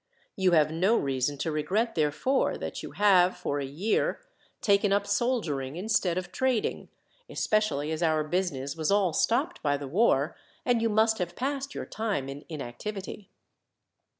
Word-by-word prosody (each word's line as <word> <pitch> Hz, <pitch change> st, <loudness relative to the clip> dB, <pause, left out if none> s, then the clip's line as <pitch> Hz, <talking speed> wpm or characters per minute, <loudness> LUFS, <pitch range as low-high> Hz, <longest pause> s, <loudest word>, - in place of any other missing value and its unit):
You 190 Hz, -2 st, +2 dB
have 155 Hz, -2 st, +4 dB
no 190 Hz, +8 st, +2 dB
reason 135 Hz, +1 st, -1 dB
to 160 Hz, +4 st, -2 dB
regret, 190 Hz, +10 st, 0 dB
therefore, 155 Hz, -, +1 dB
that -, -, -5 dB
you -, -, -8 dB
have, 185 Hz, -3 st, +4 dB
for 145 Hz, -, -2 dB
a 140 Hz, -, -2 dB
year, 195 Hz, -, 0 dB, 0.4 s
taken 200 Hz, -1 st, +3 dB
up 200 Hz, 0 st, +2 dB
soldiering 200 Hz, -, -1 dB
instead 185 Hz, -2 st, 0 dB
of 180 Hz, -1 st, -4 dB
trading, 255 Hz, +1 st, -1 dB, 0.4 s
especially 210 Hz, -9 st, 0 dB
as 160 Hz, +1 st, -3 dB
our 155 Hz, -2 st, +2 dB
business 150 Hz, -5 st, -2 dB
was 160 Hz, -2 st, -1 dB
all 200 Hz, -4 st, +3 dB
stopped 275 Hz, -, +1 dB
by 145 Hz, -1 st, +1 dB
the 140 Hz, -1 st, -6 dB
war, 155 Hz, -, +2 dB, 0.3 s
and 240 Hz, -2 st, +2 dB
you 230 Hz, -, +2 dB
must 220 Hz, +1 st, +3 dB
have 175 Hz, -1 st, -3 dB
passed 275 Hz, +1 st, -3 dB
your -, -, -4 dB
time 205 Hz, -12 st, -2 dB
in 140 Hz, +2 st, -8 dB
inactivity." 190 Hz, -, -6 dB
185 Hz, 160 wpm, -28 LUFS, 150-220 Hz, 0.4 s, have